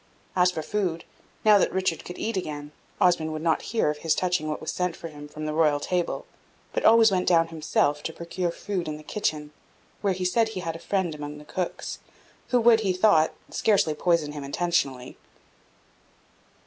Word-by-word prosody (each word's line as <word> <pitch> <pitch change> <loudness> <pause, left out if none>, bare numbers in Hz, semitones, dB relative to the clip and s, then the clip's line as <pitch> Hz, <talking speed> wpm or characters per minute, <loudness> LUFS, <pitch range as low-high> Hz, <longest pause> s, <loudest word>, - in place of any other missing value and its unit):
As 180 -1 +5
for 160 -3 -4
food, 180 -3 -2 0.4
now 210 -1 +7
that - - +2
Richard 185 -3 -1
could 180 - -8
eat 230 - -2
again, 150 -5 -4 0.3
Osmond 175 -3 +3
would 155 0 -5
not 165 -1 +2
hear 220 -10 +2
of 150 - -7
his 160 0 +1
touching 180 -4 0
what 150 - -3
was 160 - -4
sent 180 -2 -1
for 165 - -8
him 150 -1 -10
from 155 +1 -7
the 155 - -2
royal 155 -2 +3
table, 175 +3 -2 0.5
but - - -1
always 225 -1 +7
went 185 -1 0
down 165 -2 +4
himself 150 -2 0
to 160 - -4
procure 170 +2 -3
food 180 0 -4
in 150 -1 -4
the 155 - -12
kitchen, 150 -5 -2 0.5
where 200 -2 +2
he 185 0 -3
said 220 +5 +2
he 195 -4 -5
had 165 -2 -3
a - - -7
friend 190 -4 -1
among 150 0 -7
the 150 - -12
cooks, 180 +2 -4 0.5
who 250 - +3
would, 230 -1 +6
he 195 -4 +1
thought, 180 -4 +4 0.2
scarcely 200 -7 +2
poison 165 -2 +1
him 145 -1 -6
intentionally. 140 -4 -1
170 Hz, 195 wpm, -26 LUFS, 155-185 Hz, 0.5 s, now